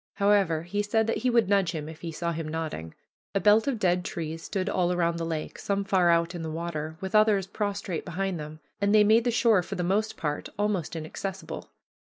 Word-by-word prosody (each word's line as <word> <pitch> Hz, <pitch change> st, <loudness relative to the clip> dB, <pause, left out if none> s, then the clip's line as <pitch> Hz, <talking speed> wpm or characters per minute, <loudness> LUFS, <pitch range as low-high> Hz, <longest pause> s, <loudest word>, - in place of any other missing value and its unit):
However, 200 Hz, -6 st, +3 dB
he 205 Hz, +4 st, -1 dB
said 220 Hz, +2 st, +1 dB
that 225 Hz, -, 0 dB
he 250 Hz, +4 st, +1 dB
would 235 Hz, -3 st, +3 dB
nudge 195 Hz, -4 st, +2 dB
him 155 Hz, -2 st, -4 dB
if 160 Hz, 0 st, -10 dB
he 170 Hz, -, -4 dB
saw 170 Hz, +2 st, -2 dB
him 165 Hz, -1 st, -4 dB
nodding. 155 Hz, -, -4 dB, 0.4 s
A -, -, +4 dB
belt 210 Hz, +5 st, +5 dB
of 270 Hz, -4 st, +1 dB
dead 180 Hz, -3 st, +1 dB
trees 165 Hz, -2 st, -4 dB
stood 190 Hz, +2 st, -3 dB
all 180 Hz, -3 st, +1 dB
around 170 Hz, -1 st, +1 dB
the 165 Hz, -, -2 dB
lake, 160 Hz, -2 st, -4 dB
some 200 Hz, 0 st, -1 dB
far 190 Hz, -3 st, +3 dB
out 170 Hz, +1 st, +3 dB
in 175 Hz, -, -5 dB
the 160 Hz, -, -4 dB
water, 160 Hz, -1 st, -4 dB
with 190 Hz, 0 st, -5 dB
others 215 Hz, -3 st, +4 dB
prostrate 200 Hz, -3 st, -3 dB
behind 190 Hz, 0 st, -2 dB
them, 155 Hz, +1 st, -8 dB, 0.2 s
and 200 Hz, +1 st, +3 dB
they 210 Hz, -, +7 dB
made 220 Hz, +3 st, +4 dB
the -, -, +3 dB
shore, 230 Hz, -4 st, +4 dB
for 195 Hz, -, -6 dB
the 180 Hz, -, -2 dB
most 205 Hz, +5 st, 0 dB
part, 150 Hz, -2 st, -3 dB
almost 200 Hz, -6 st, -1 dB
inaccessible. 185 Hz, +4 st, -6 dB
185 Hz, 225 wpm, -27 LUFS, 165-205 Hz, 0.4 s, they